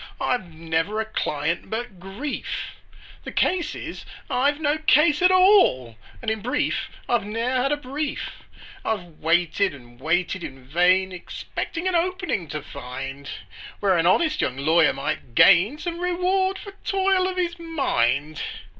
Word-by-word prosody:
I've 215 -9 -1
never 165 +6 -1
a 220 - 0
client 165 -6 -2
but 220 -4 -5
grief: 200 +11 -5 0.5
The - - -6
case 360 -2 +1
is, - - -7 0.3
I've 285 +4 +2
no 305 0 +1
case 300 +1 +4
at 365 - +6
all, 370 - +5 0.3
And 220 - 0
in 220 -1 -3
brief, 255 +7 -1 0.2
I've 240 -3 +2
ne'er 230 +5 -1
had 275 +2 +1
a 295 - +1
brief! 290 +2 -5 0.4
"I've 175 -7 -4
waited 175 +2 +2
and 120 -2 -16
waited 175 +4 0
in 135 -1 -8
vain, 180 +6 +3
Expecting 330 - -5
an 370 - 0
'opening' 345 - -1
to 150 -1 -5
find, 135 +1 -7 0.5
Where 195 -2 +3
an 170 0 +2
honest 310 - +3
young 125 - -1
lawyer 160 +3 +4
might 145 -6 -4
gain 195 - +6
Some 340 +1 -4
reward 365 +2 +1
for 400 - -9
toil 385 -1 +2
of 370 -1 -4
his 345 -1 -1
mind. 155 - 0
215 Hz, 150 wpm, -24 LUFS, -, 0.5 s, at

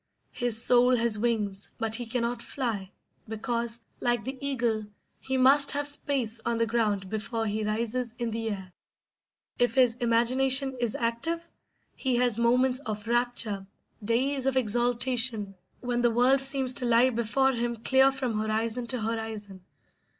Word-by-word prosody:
His 240 -3 +1
soul 245 +1 +5
has 230 -3 0
wings, 210 -4 -2
but 225 -1 -3
he 240 +1 -1
cannot 235 0 -2
fly, 225 -9 -4 0.4
because, 235 +1 -3 0.2
like 240 -3 0
the 265 +4 -5
eagle, 235 -6 -1 0.3
he 265 0 -3
must 275 +2 +6
have 290 0 +1
space 260 -6 -2
on 235 -1 -1
the 230 - +1
ground 215 -4 -1
before 220 +2 -3
he 215 0 -2
rises 230 +3 -3
in 235 -1 -3
the 225 0 -3
air. 190 -3 -7 0.9
If 245 +1 +1
his 250 -3 +4
imagination 260 +3 +2
is 240 -3 -2
active 325 +9 -2 0.5
he 260 -2 -1
has 240 -2 +2
moments 250 +2 +2
of 215 -5 -6
rapture, 235 -5 -1 0.4
days 260 +5 0
of 265 -1 +1
exaltation, 240 -2 +1 0.3
when 245 -1 -2
the 240 - +3
world 250 +4 +3
seems 270 -1 +3
to 250 - +2
lie 240 +2 +4
before 240 +3 +1
him 240 -1 -2
clear 265 +4 +3
from 255 -5 -3
horizon 220 +2 -1
to 250 -1 -3
horizon. 215 -4 -5
235 Hz, 150 wpm, -27 LUFS, 225-255 Hz, 0.9 s, must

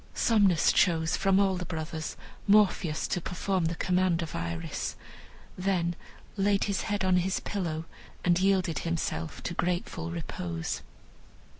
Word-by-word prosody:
Somnus 200 -8 +4
chose, 160 -2 +3
from 195 0 +3
all 195 -2 +3
the 180 - -3
brothers, 160 -2 -4 0.3
Morpheus, 195 -6 +3
to 180 - -1
perform 180 +1 -1
the 165 +1 0
command 180 -1 +1
of 160 - -6
Iris; 85 -1 -3 0.6
then 180 -2 0 0.4
laid 200 0 +2
his 200 -2 0
head 205 -2 -1
on 185 -1 +4
his 185 +1 +1
pillow 165 -5 -3 0.4
and 175 0 +4
yielded 185 -5 +2
himself 160 - -3
to - - -3
grateful 175 -1 -2
repose. 90 - -4
180 Hz, 135 wpm, -29 LUFS, 160-190 Hz, 0.6 s, Somnus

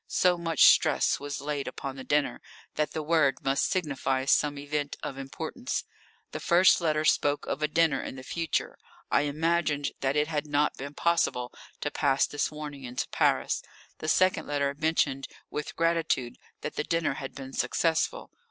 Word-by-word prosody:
So 180 -1 +3
much 165 -3 +2
stress - - +5
was 145 -1 -5
laid 145 -1 -3
upon 135 -1 -5
the 135 - -7
dinner, 145 +1 0 0.3
that 150 0 0
the 155 - -3
word 150 -4 +3
must 135 0 +2
signify 135 -6 -1
some 145 +1 +2
event 145 0 -3
of - - -4
importance. 160 - -4 0.5
The - - -5
first 180 +1 +5
letter 155 -2 +1
spoke 145 -1 +2
of 150 - -3
a 150 - +2
dinner 155 -3 +2
in - - -6
the 130 - -9
future. 165 +3 -2 0.3
I 145 - +3
imagined 155 -1 0
that 135 +1 0
it 150 0 +2
had 155 -1 -2
not 145 0 +1
been 140 +2 -7
possible 145 -7 +1 0.3
to 145 - -2
pass 140 -2 +2
this 145 - -1
warning 150 -2 -8
into 125 0 -4
Paris. - - +1 0.4
The 155 - -3
second 185 +2 +3
letter 140 -1 0
mentioned 145 -3 0 0.2
with 150 - -4
gratitude 165 -7 0 0.2
that 150 - -5
the - - 0
dinner 165 -3 0
had 135 - -7
been 135 -1 -8
successful. 165 - 0
150 Hz, 170 wpm, -28 LUFS, 140-160 Hz, 0.5 s, stress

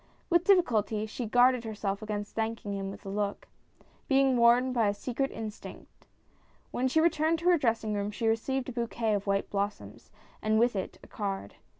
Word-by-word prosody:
With 345 0 +4
difficulty 220 - +3
she 225 +2 -5
guarded 245 +1 +4
herself 210 -2 -3
against 210 -1 -4
thanking 220 -2 -3
him 195 -1 -3
with 195 - -10
a - - -5
look, 200 0 -3 0.6
being 270 -1 +3
warned 245 +2 +4
by 230 -4 +2
a 205 - 0
secret 255 +5 -2
instinct. 220 -1 -9 0.6
When 255 - 0
she 290 +5 +2
returned 320 0 +2
to 355 - +3
her 350 - +5
dressing 225 -4 0
room 205 0 -1
she 210 +2 -4
received 250 +4 0
a - - -4
bouquet 235 -2 -1
of 200 0 -2
white 195 0 0
blossoms, 200 +1 -4 0.3
and 215 0 +2
with 235 0 +3
it 190 - -4
a - - -13
card. 195 - -4
225 Hz, 185 wpm, -29 LUFS, 205-255 Hz, 0.6 s, her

